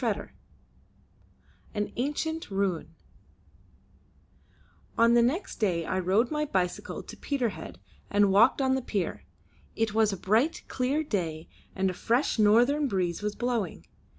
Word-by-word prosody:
CHAPTER - - -2
III - - -33 0.3
AN - - -8
ANCIENT 310 +5 -2
RUNE 190 -5 -2 2.0
On 230 +1 +5
the 240 - +6
next 295 +12 -1
day 175 -7 0
I 185 - -1
rode 195 +7 +2
on - - -4
my 300 0 0
bicycle 185 -9 -2
to - - -10
Peterhead, 235 - -3 0.3
and 205 -1 +3
walked 230 +7 +5
on 260 0 +2
the 265 - 0
pier. 200 -7 -3 0.5
It 225 -2 0
was 220 -1 +3
a 195 - -4
bright 225 - +1
clear 270 +5 0
day, 170 - -3 0.3
and 190 -1 +1
a - - -7
fresh 235 +6 0
northern 245 +8 +4
breeze 180 -6 -1
was 210 0 -2
blowing. 230 - -2
220 Hz, 145 wpm, -28 LUFS, 190-260 Hz, 2.0 s, the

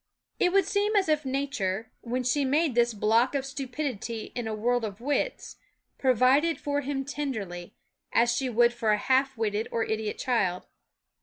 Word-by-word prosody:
It 360 - +3
would 390 -1 +4
seem 415 +3 0
as 395 -3 +3
if 305 -2 +1
Nature, 230 -6 -2
when 250 +2 -2
she 280 +4 +1
made 290 +2 +2
this 240 0 +3
block 225 +6 +2
of 270 -1 -1
stupidity 260 -4 -4
in 240 -2 -4
a 220 - -2
world 240 +2 0
of 205 -1 -5
wits, 290 - -2 0.4
provided 265 +6 +3
for 285 0 -1
him 270 -1 -3
tenderly, 220 -12 -5 0.4
as 240 +1 +3
she 260 +1 -1
would 240 0 +4
for 230 -2 -1
a 210 - +4
half 265 +3 +1
witted 215 0 -1
or 230 - 0
idiot 220 -1 -2
child. 190 -8 0
250 Hz, 170 wpm, -27 LUFS, 220-280 Hz, 0.4 s, would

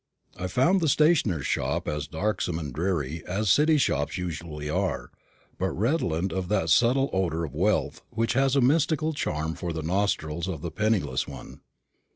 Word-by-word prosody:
I 90 - -4
found 170 - +3
the 160 - +2
stationer's 135 - +3
shop - - -1
as 75 -1 -2
darksome 90 0 -1
and 75 -5 -5
dreary 80 -2 -2
as 100 +2 +1
City 155 - +4
shops 75 - 0
usually 80 -4 -5
are, 90 +5 -2 0.5
but 95 +1 +1
redolent 95 - 0
of 95 -1 -2
that 95 -5 +1
subtle 125 - +4
odour 85 -3 0
of 70 - -9
wealth 75 -4 0
which 115 0 0
has 135 +2 +2
a 140 - +4
mystical 155 +3 +2
charm 80 - -2
for 85 +1 -4
the 80 -1 -4
nostrils 85 -2 -1
of 85 -5 -5
the 85 - -3
penniless 100 -12 0
one. 65 -3 -10
90 Hz, 170 wpm, -26 LUFS, 80-115 Hz, 0.5 s, City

